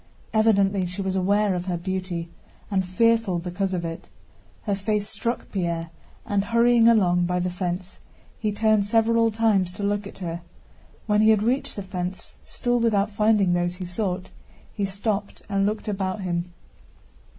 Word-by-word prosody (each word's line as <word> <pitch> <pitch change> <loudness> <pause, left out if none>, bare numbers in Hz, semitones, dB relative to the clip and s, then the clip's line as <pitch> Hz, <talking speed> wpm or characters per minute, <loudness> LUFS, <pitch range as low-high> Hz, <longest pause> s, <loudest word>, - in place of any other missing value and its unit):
Evidently 200 -4 +3
she 180 +3 -4
was 190 0 -1
aware 200 +2 +2
of 180 0 -3
her 180 -2 -1
beauty 185 -1 -3 0.4
and 190 -1 +2
fearful 225 +1 +2
because 180 +3 -2
of 175 -2 -2
it. 165 0 -6 0.5
Her 205 - -1
face 205 +1 -1
struck 230 +3 -3
Pierre 170 -3 -2 0.3
and, 205 -3 +1
hurrying 235 +1 +4
along 180 -6 +4
by 180 0 0
the 180 0 -1
fence, 180 +1 -4 0.4
he 215 -1 0
turned 215 -1 +2
several 230 +1 +3
times 210 -5 +2
to 200 +2 -6
look 205 0 -1
at - - -11
her. 170 -2 -5 0.6
When 210 -1 +3
he 215 - +5
had 215 -2 +4
reached 250 +5 0
the 200 - -5
fence, 185 -1 -5
still 245 0 -1
without 215 -3 +2
finding 210 -3 +3
those 175 0 0
he 180 0 -6
sought, 185 0 -3 0.4
he 200 - -1
stopped 200 +1 -3
and 195 -1 +1
looked 215 +1 -3
about 195 -1 -2
him. 175 -1 -2
195 Hz, 165 wpm, -24 LUFS, 180-215 Hz, 0.6 s, he